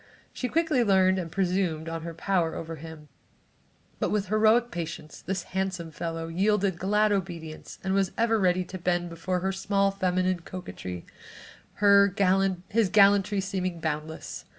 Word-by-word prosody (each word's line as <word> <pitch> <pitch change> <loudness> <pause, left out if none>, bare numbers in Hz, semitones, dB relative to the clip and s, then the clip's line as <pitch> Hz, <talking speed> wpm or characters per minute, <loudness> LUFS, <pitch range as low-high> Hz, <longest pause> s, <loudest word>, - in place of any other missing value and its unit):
She 250 - -3
quickly 315 -5 +2
learned 190 -2 +4
and 165 -3 -5
presumed 180 -4 0
on 165 0 -4
her 165 0 -7
power 170 -1 0
over 165 0 -6
him 160 0 -10 0.9
but - - 0
with 205 -3 -1
heroic 220 +3 +3
patience 165 -4 -6
this 190 -1 -3
handsome 185 -3 -2
fellow 165 +1 -4
yielded 190 +1 +1
glad 210 +2 +2
obedience 170 -5 -4
and 190 0 0
was 195 -1 +1
ever 225 -1 +2
ready 185 -1 +2
to 185 +1 -8
bend 175 0 -1
before 180 +2 -2
her 190 +1 0
small 195 +1 +1
feminine 185 -1 0
coquetry, 165 - -7 0.7
his 195 0 +3
gallantry 200 0 +4
seeming 185 -3 -3
boundless. 160 0 -4
185 Hz, 145 wpm, -27 LUFS, 170-200 Hz, 0.9 s, learned